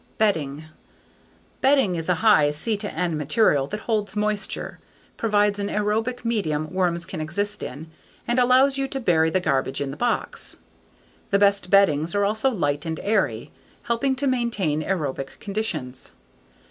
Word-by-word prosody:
Bedding 160 -9 0 1.0
Bedding 265 -9 +3
is 165 +1 -4
a 180 - +4
high 155 -9 +6
C/N 180 0 -2
material 150 -2 +2
that 210 +5 -5
holds 215 -3 -2
moisture, 210 0 -2 0.4
provides 205 -2 +1
an 200 0 -2
aerobic 225 +4 -1
medium 155 -9 -1
worms 175 -2 0
can 180 -3 -6
exist 205 +7 -3
in, 155 +5 -7 0.4
and 240 +1 +1
allows 260 +2 +4
you 270 - 0
to 270 0 -4
bury 165 -8 +3
the 185 - +1
garbage 135 -5 -1
in 140 -1 -3
the - - -7
box. 240 +7 -2 0.7
The 200 - +3
best 200 -2 +2
beddings 170 -4 +3
are 205 0 +2
also 220 +6 +1
light 145 - -1
and 160 -1 -4
airy, 215 +2 0 0.3
helping 265 +3 0
to 275 +2 -2
maintain 235 - 0
aerobic 145 -6 -3
conditions. 185 -12 -4
200 Hz, 145 wpm, -24 LUFS, 155-220 Hz, 1.0 s, high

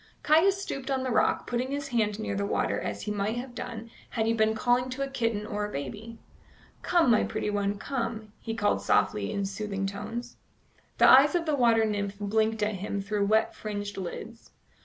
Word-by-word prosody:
Caius 360 +6 +4
stooped 275 -8 -5
on 265 -1 0
the 260 - -2
rock, - - +2
putting 245 +2 -2
his 285 0 -3
hand 215 -4 +1
near 215 -2 -3
the 200 - -1
water 200 - 0
as - - -4
he 210 - -3
might 205 +2 -1
have 245 +1 -6
done 230 -1 -7 0.2
had 220 -2 -1
he 225 - +2
been 220 -1 +2
calling 245 +2 +2
to 260 +2 -3
a - - -2
kitten 230 -5 -1
or 210 0 -3
a 210 - -3
baby. 205 - -6 0.6
"Come, 340 -8 +3
my 220 - +4
pretty 210 - -2
one, 205 0 -1
come," 230 -4 -4
he 225 -1 -4
called 205 -2 +1
softly 100 0 +1
in 200 - -1
soothing 195 0 -3
tones. 235 +5 -5 0.6
The - - +6
eyes 280 +5 +7
of 340 -1 +1
the 305 -2 +1
water 230 -4 +4
nymph 205 -2 -2
blinked 220 +1 +1
at 210 -1 0
him 200 +1 -3
through 200 0 -1
wet 220 +1 +2
fringed 205 -1 -5
lids. 220 +5 -7
220 Hz, 200 wpm, -28 LUFS, 205-245 Hz, 0.6 s, eyes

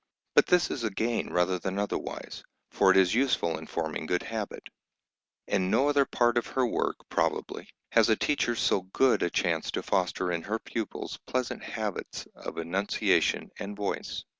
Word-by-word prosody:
But - - +5
this 180 -1 +3
is 130 - -3
a 110 - +1
gain 115 +4 -1
rather 90 +1 +1
than 95 +2 -3
otherwise, 100 0 -4 0.3
for - - +4
it - - +6
is 95 -2 +5
useful 125 -9 +1
in - - -10
forming 80 -1 -3
good 90 +1 0
habit. 110 -3 -5 0.8
In 95 0 0
no 140 +8 +3
other 145 -1 +4
part 120 -2 +2
of - - -7
her 130 -1 +1
work, 120 - 0
probably, - - -1 0.2
has - - +5
a 110 - +5
teacher 120 -1 +1
so 100 - +2
good 120 +8 +2
a 85 - +2
chance - - 0
to - - -2
foster 95 -1 0
in 85 -1 -1
her 105 +6 -2
pupils 115 -1 -5
pleasant 130 -1 -2
habits 110 -4 -4
of - - -8
enunciation 90 +5 +1
and 100 +1 -6
voice. 100 -1 -3
105 Hz, 175 wpm, -29 LUFS, 90-120 Hz, 0.8 s, it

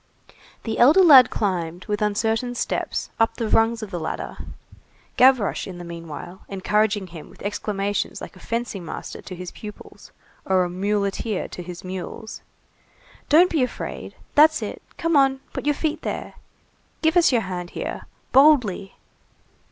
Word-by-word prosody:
The 225 -1 -3
elder 300 +11 +7
lad 275 -8 +9
climbed, 180 -4 -2
with 210 -1 -2
uncertain 225 +4 0
steps, - - -2
up 225 - +2
the 230 - -2
rungs 225 +1 +2
of 205 - -7
the 175 - -3
ladder; 160 - -5 0.8
Gavroche, 255 -5 +4
in 185 -2 -8
the 175 - -8
meanwhile, 170 +1 -8
encouraging 205 +1 0
him 165 -4 -11
with - - -15
exclamations 205 0 -2
like - - -9
a - - -15
fencing 230 -5 -4
master 165 - -7
to 185 - -8
his 180 0 -7
pupils, 210 -1 -11 0.3
or 185 -1 +2
a 175 - -3
muleteer 200 +2 -1
to - - -7
his 175 0 -9
mules. 190 +4 -7 0.9
"Don't 340 +4 +6
be 315 - +1
afraid!—That's 300 +4 +1
it!—Come 335 -1 -3
on!—Put 270 0 +1
your 295 - +3
feet 315 +1 -2
there!—Give 320 +1 -5
us 345 -4 +5
your 240 -3 +3
hand 180 -3 -5
here!—Boldly!" 245 - +1
210 Hz, 140 wpm, -23 LUFS, 185-255 Hz, 0.9 s, lad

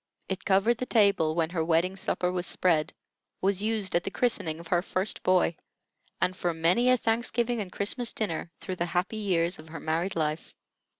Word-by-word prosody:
It 190 -1 -4
covered 205 +5 +3
the 255 - -3
table 200 -8 +3
when 165 -1 0
her 165 -3 0
wedding 170 +3 +1
supper 180 -1 0
was 180 0 -2
spread, 165 -4 +1 0.5
was 195 0 +1
used 215 -3 0
at 175 - +2
the - - -2
christening 185 -9 0
of 165 -1 -11
her 175 -1 +3
first 185 +2 -2
boy, 180 -2 +3 0.6
and 185 - +1
for 175 -2 -1
many 175 +10 +3
a 255 - +5
Thanksgiving 235 0 0
and 185 -3 -6
Christmas 230 +5 -1
dinner 175 -6 -3
through 185 -1 -5
the 175 - -1
happy 190 +5 0
years 180 -4 0
of 160 +1 -12
her 165 - -7
married 165 +4 -1
life. 155 0 -2
185 Hz, 190 wpm, -28 LUFS, 165-210 Hz, 0.6 s, a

